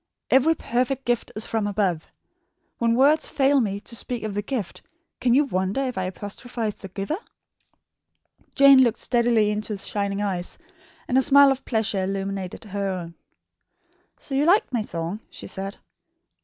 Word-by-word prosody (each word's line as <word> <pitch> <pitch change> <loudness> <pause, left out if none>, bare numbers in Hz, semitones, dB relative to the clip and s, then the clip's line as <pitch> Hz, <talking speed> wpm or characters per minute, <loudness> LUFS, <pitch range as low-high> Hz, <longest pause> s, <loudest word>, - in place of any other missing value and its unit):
'Every 290 +5 +5
perfect 255 +1 -1
gift 240 -1 -1
is 215 - -1
from 220 -2 -1
above.' 190 -6 -1 0.7
When 230 -1 +2
words 290 +5 +4
fail 275 0 +3
me 200 -3 -2
to 235 - -6
speak 240 0 -4
of 215 -2 -3
the 205 - -1
gift, 215 -5 -4 0.4
can 245 -1 +3
you 290 - +5
wonder 190 0 -1
if 255 -3 -2
I 185 - -2
apostrophise 210 +4 -5
the 195 - -10
Giver?" 200 - -4 1.4
Jane 275 -1 +8
looked 235 -2 +1
steadily 235 -3 +2
into 215 +1 -2
his 195 - -3
shining 200 -1 -2
eyes, 185 -3 -3 0.5
and 255 - +3
a - - +4
smile 280 0 +6
of 270 0 -3
pleasure 215 -4 0
illumined 195 0 -4
her 200 -1 -3
own. 175 -3 -5 1.0
"So 275 - -9
you 275 +2 +2
liked 350 -2 +3
my 235 - +1
song?" 175 -1 -4
she - - -10
said. 195 +1 -6
220 Hz, 165 wpm, -24 LUFS, 195-260 Hz, 1.4 s, Jane